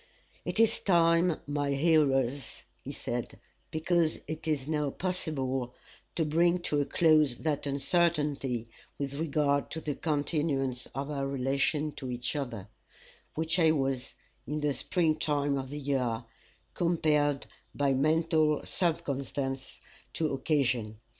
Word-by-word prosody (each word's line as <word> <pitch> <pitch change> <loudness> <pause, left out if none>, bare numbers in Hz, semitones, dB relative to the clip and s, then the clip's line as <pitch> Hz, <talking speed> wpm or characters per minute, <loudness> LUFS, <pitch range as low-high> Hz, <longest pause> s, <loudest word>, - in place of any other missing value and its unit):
"It - - -2
is 225 -1 +4
time, 170 -2 +3
my 145 -1 -1
hearers," 140 -4 +2 0.2
he - - -5
said, - - -4 0.3
"because 165 0 +1
it 155 +1 -5
is 145 -4 0
now 150 -2 0
possible, 135 -8 -2 0.4
to 160 - +1
bring 170 +3 +3
to 150 -4 0
a - - 0
close 155 -6 +4
that 145 +1 -2
uncertainty 140 -5 +1 0.3
with 140 -1 -3
regard 145 -1 +1
to 160 - -4
the 150 -2 -3
continuance 145 -4 -1
of 140 +2 -3
our 140 -2 -1
relation 140 +3 0
to 130 -3 -5
each 125 +2 -3
other, 120 -9 -4 0.7
which 160 +3 0
I 160 -2 +5
was, 135 -3 -1 0.3
in 150 +2 -2
the 150 -1 +1
spring 160 +1 +1
time 145 -1 +1
of 135 -1 -3
the 145 - -5
year, 130 -5 -1 0.5
compelled 150 -4 +1 0.3
by 140 -1 +2
mental 155 +2 +2
circumstance 140 -5 -2 0.3
to 155 -3 0
occasion. 130 -6 0
145 Hz, 130 wpm, -30 LUFS, 135-160 Hz, 0.7 s, I